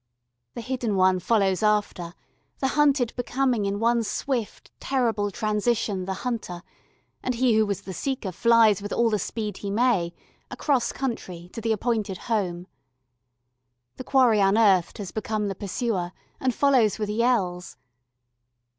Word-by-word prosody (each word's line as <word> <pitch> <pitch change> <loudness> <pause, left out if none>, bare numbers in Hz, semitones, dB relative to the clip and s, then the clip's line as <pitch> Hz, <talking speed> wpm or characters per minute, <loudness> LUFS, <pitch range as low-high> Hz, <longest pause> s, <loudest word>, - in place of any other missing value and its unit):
The - - -5
hidden 245 -4 -2
one 185 -1 +3
follows 195 0 +1
after 205 -5 0 0.4
the 265 - 0
hunted 280 -4 +2
becoming 245 -3 0
in 200 +1 -2
one 235 +1 +2
swift 235 0 -3
terrible 230 -6 0
transition 210 -2 -1
the 190 0 -3
hunter, 210 -8 -4 0.6
and 255 - -2
he 245 0 +3
who 220 0 +3
was 200 -1 -2
the 190 - -8
seeker 255 -2 -3
flies 225 0 +4
with 205 - -6
all 235 -1 +2
the 210 - +1
speed 210 -1 -4
he 200 - -5
may, 200 -6 +1 0.3
across 255 -5 0
country, 185 -9 -5
to 225 - -6
the 225 0 0
appointed 215 -3 -1
"home." 185 -7 -2 1.3
The - - -6
quarry 250 -5 +4
unearthed 195 -2 +3
has 200 -3 -6
become 215 -1 -2
the - - -2
pursuer 190 -2 -3 0.3
and 260 - +1
follows 250 -5 +3
with 210 -2 -3
yells. 205 - 0
215 Hz, 145 wpm, -25 LUFS, 195-240 Hz, 1.3 s, flies